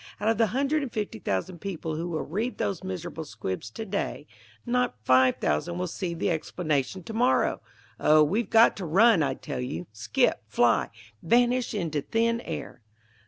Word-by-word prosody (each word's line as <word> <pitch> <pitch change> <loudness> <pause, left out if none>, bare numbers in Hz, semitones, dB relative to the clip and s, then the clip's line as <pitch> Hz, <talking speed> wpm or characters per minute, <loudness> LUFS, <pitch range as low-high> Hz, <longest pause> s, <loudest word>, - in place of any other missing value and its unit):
Out 210 +2 +1
of 225 -1 +1
the 225 - +4
hundred 275 +7 0
and 270 -4 -4
fifty 210 - -4
thousand 155 - -3
people 165 -5 -4
who 170 +3 -3
will 160 -2 -2
read 220 +9 -3
those 190 -2 -2
miserable 175 -3 -5
squibs 110 -5 -5
to 220 - -7
day, 200 0 -3 0.4
not 250 - +1
five 130 +2 +5
thousand 75 - -1
will 180 - -1
see 175 0 -4
the 185 +3 0
explanation 155 0 -2
to 225 - -7
morrow. 245 +3 +2 0.4
Oh, 155 0 +6
we've 205 +10 0
got 225 +1 +6
to 190 - -4
run, 200 +3 +5
I 135 -3 0
tell - - -5
you; 90 -9 -4
skip, 110 0 +1
fly, 115 +2 +2 0.3
vanish 245 +5 +2
into 160 -7 -1
thin 230 +6 0
air!" 150 -6 -6
175 Hz, 175 wpm, -27 LUFS, 145-225 Hz, 0.4 s, Oh